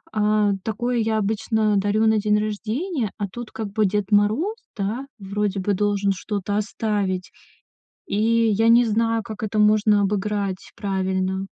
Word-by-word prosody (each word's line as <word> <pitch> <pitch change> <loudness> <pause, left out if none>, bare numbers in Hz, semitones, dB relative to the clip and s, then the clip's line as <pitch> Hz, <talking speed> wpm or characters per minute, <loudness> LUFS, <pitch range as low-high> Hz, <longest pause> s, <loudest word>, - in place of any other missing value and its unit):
э, 210 -1 +2
такое 240 +3 -1
я 220 0 +1
обычно 215 0 +1
дарю 205 +3 +2
на 220 0 +4
день 210 0 +2
рождения. 220 - -2
А 205 - -1
тут 240 +1 -8
как 215 -3 -5
бы 215 0 +2
Дед 205 0 -1
Мороз, 215 - +2 0.2
да, 220 +7 -2
вроде 200 0 -2
бы 200 +2 0
должен 200 0 +1
что-то 205 +1 -3
оставить. 205 -3 -2 0.8
И 225 +3 +2
я 220 +2 +2
не 235 +1 +7
знаю, 225 0 +1
как 220 0 -7
это 215 0 -1
можно 210 0 +4
обыграть 200 -1 -2
правильно. 190 -1 -1
210 Hz, 150 wpm, -23 LUFS, 200-220 Hz, 0.8 s, не